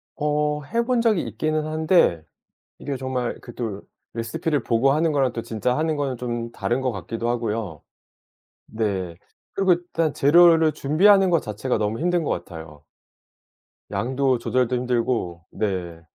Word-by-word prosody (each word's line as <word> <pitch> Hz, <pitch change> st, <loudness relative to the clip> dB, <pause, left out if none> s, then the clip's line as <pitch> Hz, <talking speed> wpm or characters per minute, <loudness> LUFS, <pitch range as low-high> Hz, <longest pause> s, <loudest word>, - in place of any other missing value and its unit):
어 150 Hz, 0 st, 0 dB
해 230 Hz, +11 st, -1 dB
본 250 Hz, -1 st, +1 dB
적이 220 Hz, -7 st, +2 dB
있기는 155 Hz, +8 st, -2 dB
한데 155 Hz, -, +2 dB, 0.6 s
이게 140 Hz, -2 st, -4 dB
정말 130 Hz, -2 st, -3 dB
그 120 Hz, -, -11 dB
또 110 Hz, -5 st, -4 dB, 0.3 s
레시피를 145 Hz, +5 st, -2 dB
보고 120 Hz, +4 st, +2 dB
하는 160 Hz, +2 st, +2 dB
거랑 135 Hz, -4 st, +1 dB
또 115 Hz, -, -3 dB
진짜 115 Hz, +3 st, -1 dB
하는 160 Hz, 0 st, 0 dB
거는 140 Hz, -3 st, -1 dB
좀 120 Hz, -1 st, -4 dB
다른 120 Hz, +2 st, -1 dB
것 130 Hz, -, 0 dB
같기도 115 Hz, +5 st, -4 dB
하고요. 110 Hz, -9 st, -3 dB, 0.9 s
네. 95 Hz, -6 st, -3 dB, 0.4 s
그리고 195 Hz, -2 st, +3 dB
일단 170 Hz, -3 st, -1 dB
재료를 165 Hz, +1 st, +5 dB
준비하는 190 Hz, +8 st, +4 dB
것 170 Hz, -2 st, +3 dB
자체가 110 Hz, +5 st, -2 dB
너무 105 Hz, +1 st, -1 dB
힘든 175 Hz, +1 st, +1 dB
것 -, -, -2 dB
같아요. 80 Hz, -4 st, -6 dB, 1.1 s
양도 130 Hz, +6 st, 0 dB
조절도 125 Hz, +1 st, 0 dB
힘들고 120 Hz, -9 st, -1 dB
네. 90 Hz, -5 st, -3 dB
125 Hz, 285 characters per minute, -23 LUFS, 110-155 Hz, 1.1 s, 재료를